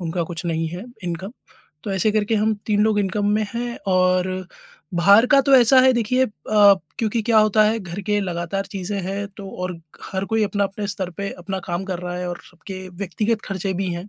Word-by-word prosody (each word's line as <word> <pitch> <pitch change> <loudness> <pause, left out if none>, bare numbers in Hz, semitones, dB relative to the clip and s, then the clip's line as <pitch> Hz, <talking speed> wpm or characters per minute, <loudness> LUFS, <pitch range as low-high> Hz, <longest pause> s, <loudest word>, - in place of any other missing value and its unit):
उनका 170 0 -2
कुछ 165 0 -7
नहीं 165 -1 -1
है 180 +6 -7 0.2
इनकम 180 +4 -4 0.5
तो 200 - -3
ऐसे 195 +3 +2
करके 215 +1 +1
हम 215 +1 +2
3 210 -1 +2
लोग 215 -1 +2
इनकम 205 +1 -1
में 215 - +1
है 240 0 -3
और 185 0 +3 0.7
बाहर 200 +7 +6
का 275 - +7
तो 275 +1 +4
ऐसा 255 +2 +6
है 260 0 +5
देखिए 245 +3 +2
अ, - - -4 0.7
क्योंकि 225 0 0
क्या 225 0 +4
होता 215 0 +4
है 220 +2 +2
घर 185 0 -6
के 205 +1 0
लगातार 180 +1 -3
चीज़ें 195 +1 -3
हैं, 195 +2 -3
तो 195 -1 -10
और 180 -2 -5 0.3
हर 190 0 -1
कोई 220 0 +1
अपना 205 0 0
अपने 200 +1 -4
स्तर 190 -2 -3
पे 200 0 -3
अपना 190 +2 -4
काम 175 +2 -2
कर 185 -2 -4
रहा 180 0 -4
है 180 0 -3
और 175 0 -5
सबके 185 +1 -9
व्यक्तिगत 200 +4 -2
खर्चे 195 -1 -2
भी 190 +1 -2
हैं, 175 +4 -6
195 Hz, 215 wpm, -22 LUFS, 180-215 Hz, 0.7 s, का